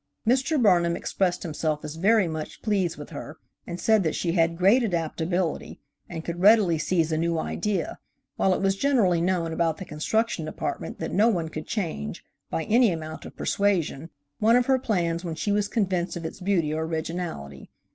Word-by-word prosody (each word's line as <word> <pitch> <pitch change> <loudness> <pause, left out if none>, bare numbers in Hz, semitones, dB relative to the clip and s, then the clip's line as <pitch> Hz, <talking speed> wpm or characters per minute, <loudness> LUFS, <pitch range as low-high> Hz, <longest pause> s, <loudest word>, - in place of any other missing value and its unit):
Mr. 270 +5 +2
Burnham 175 -6 +4
expressed 180 -1 -1
himself 155 -1 -2
as 150 - -5
very 200 +3 +3
much 160 -1 -6
pleased 195 -6 0
with 145 - -9
her 150 +3 -8 0.3
and 175 0 -5
said 220 -2 +4
that 160 -4 -1
she 170 - -1
had 165 -1 +2
great 200 +8 +5
adaptability, 175 -3 -2 0.3
and 165 -2 -6
could 170 0 -4
readily 195 -4 +5
seize 165 0 +1
a 155 - 0
new 170 0 0
idea, 195 +2 -2 0.4
while 190 - +2
it - - -3
was 195 0 +2
generally 195 -9 +2
known 170 -2 0
about 165 -1 0
the 190 - -7
Construction 175 +5 -1
Department 155 - -4
that 160 - -4
no 210 +4 +4
one 170 -7 -1
could 155 0 -7
change, 160 - -4 0.2
by 165 - -2
any 230 +1 +4
amount 160 -1 -6
of - - -11
persuasion, 170 -6 0 0.3
one 225 +2 +5
of 245 0 +4
her 265 0 +3
plans 175 -8 -1
when 165 -3 -4
she 185 +6 -1
was 205 0 +1
convinced 190 -6 -1
of 170 - -6
its 160 - -6
beauty 180 -5 +1
or 160 +1 -1
originality. 160 - -5
175 Hz, 185 wpm, -26 LUFS, 160-205 Hz, 0.4 s, great